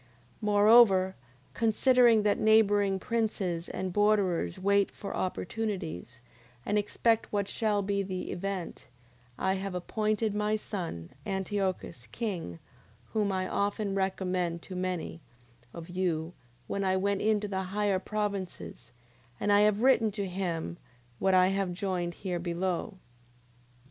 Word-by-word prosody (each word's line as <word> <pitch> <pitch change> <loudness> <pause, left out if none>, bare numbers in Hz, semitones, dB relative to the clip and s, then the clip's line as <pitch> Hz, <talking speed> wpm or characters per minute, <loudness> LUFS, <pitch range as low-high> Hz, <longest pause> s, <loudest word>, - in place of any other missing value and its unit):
9:25. 125 - -29 0.3
Moreover, 205 -2 +5 0.4
considering 230 0 +4
that 205 -1 +2
neighbouring 205 -3 +4
princes, 190 -5 -2
and 185 -1 -4
borderers, 200 - +2
wait 200 +1 +2
for 200 - -7
opportunities, 180 - -4 0.4
and 205 - 0
expect 220 +2 +1
what 200 -1 0
shall 210 -1 0
be 200 0 0
the 185 -1 -4
event, 190 -1 -5 0.5
I 190 - +1
have 195 -1 -4
appointed 215 +3 -1
my 210 +1 +1
son, 170 - -5 0.2
Antiochus, 190 - -2
king, 185 - -4 0.6
whom 210 -2 +1
I 185 -1 -1
often 200 0 -1
recommended 185 -3 -1
to 185 - -6
many 180 -2 -3 0.5
of 170 -1 -9
you, 175 -2 -2 0.3
when 200 +8 -2
I 190 0 +2
went 200 +1 0
into 210 -1 +1
the 190 -1 -2
higher 200 0 0
provinces: 200 -2 -4 0.5
and 205 - +1
I 205 - +6
have 210 0 +3
written 255 -4 +5
to 200 -1 -2
him 170 - -3 0.4
what 190 -1 +3
I 185 0 +5
have 195 -2 -1
joined 175 -2 -2
here 180 -3 -3
below. 180 +3 -2
195 Hz, 130 wpm, -29 LUFS, 180-210 Hz, 0.6 s, I